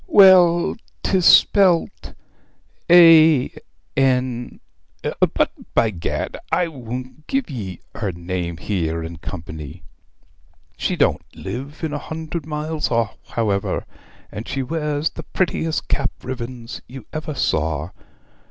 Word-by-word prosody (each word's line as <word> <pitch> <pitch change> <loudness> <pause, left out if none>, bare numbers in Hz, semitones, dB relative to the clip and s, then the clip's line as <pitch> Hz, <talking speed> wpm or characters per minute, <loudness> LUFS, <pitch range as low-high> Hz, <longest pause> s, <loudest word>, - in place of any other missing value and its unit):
Well, 180 -3 +6 0.3
'tis 185 -3 +3
spelt, 185 -4 +4 0.7
A, 165 -5 +7 0.4
N 125 -2 0 0.8
but, - - +2 0.2
by 115 - +3
gad, 85 -4 -3
I 175 -2 +2
won't 130 +1 -8
give 270 - -1
ye 95 -9 -6
her 105 -4 -2
name 85 0 -4
here 85 -4 -2
in 80 +1 -7
company. 80 -2 -8 0.9
She - - -1
don't - - +2
live 140 +6 -7
a 150 -2 -2
hundred 160 0 -6
miles 155 0 -2
off, 115 -2 0
however, 105 -4 -1 0.5
and 110 - -7
she 135 -1 -2
wears 150 +1 -1
the - - -8
prettiest 160 -1 -1
cap 135 -1 0
ribbons 125 -1 -6
you 130 -3 -10
ever 155 -1 -4
saw. 80 - -1
130 Hz, 115 wpm, -21 LUFS, 100-160 Hz, 0.9 s, A